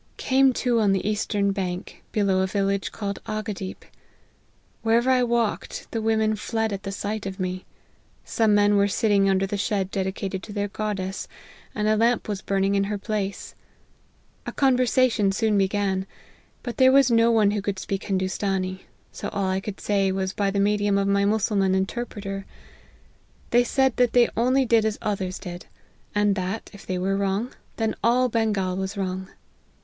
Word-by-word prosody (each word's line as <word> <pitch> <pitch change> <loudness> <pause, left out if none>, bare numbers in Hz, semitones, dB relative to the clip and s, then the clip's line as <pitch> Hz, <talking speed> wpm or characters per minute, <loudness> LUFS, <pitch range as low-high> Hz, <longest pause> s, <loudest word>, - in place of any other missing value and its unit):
" - - -36
Came 265 0 +3
to 245 -2 +1
on 205 -3 +3
the 195 +1 -1
eastern 205 -1 0
bank, 185 -1 -4
below 200 -3 +2
a 190 - +1
village 195 0 -1
called 200 -2 -4
Ahgadeep. 215 -3 -5 1.0
Wherever 235 +3 +3
I 255 -1 +4
walked, 235 -6 -1
the 225 - -2
women 220 -1 +2
fled 225 0 -2
at 195 - -4
the 195 - -5
sight 205 +1 -4
of 190 +1 -6
me. 185 0 -3 0.6
Some 220 -2 +2
men 205 0 +4
were 200 0 +4
sitting 205 -1 +2
under 190 0 +2
the 200 +1 -3
shed 195 -2 -1
dedicated 190 0 -3
to 210 - -9
their 205 0 -2
goddess; 195 -2 -3 0.5
and 210 -1 0
a 215 - +4
lamp 230 +2 +2
was 205 -2 -3
burning 195 0 0
in 200 0 +2
her 205 +1 -2
place. 200 -1 -4 0.9
A - - -2
conversation 255 -5 +3
soon 215 +1 +1
began; 195 -1 0 0.6
but 240 - -5
there 260 -1 +6
was 270 -2 +5
no 230 0 +5
one 215 -3 +4
who 205 -1 -1
could 200 -1 -3
speak 195 +1 -4
Hindoostanee; 190 -1 -2 0.3
so - - -5
all 195 -1 -1
I 190 - 0
could 195 0 -7
say 195 -2 +1
was 190 0 -2
by 200 -1 0
the 200 0 -1
medium 205 0 +2
of 200 0 +1
my 200 0 +2
mussulman 200 -2 +2
interpreter. 195 -1 -3 1.0
They 240 +1 +5
said 265 0 +1
that 245 -1 +3
they 245 -1 +5
only 255 +3 +2
did 230 -2 +3
as 220 -1 -1
others 190 -3 -2
did; 175 -1 -8 0.5
and 205 -1 +3
that, 190 +3 -4
if 200 - -13
they 185 - -1
were 190 +2 0
wrong, 200 +4 -1 0.2
then 225 -1 0
all 250 +2 +3
Bengal 210 -5 0
was 190 +2 -4
wrong. 190 -1 -3
205 Hz, 175 wpm, -24 LUFS, 195-225 Hz, 1.0 s, there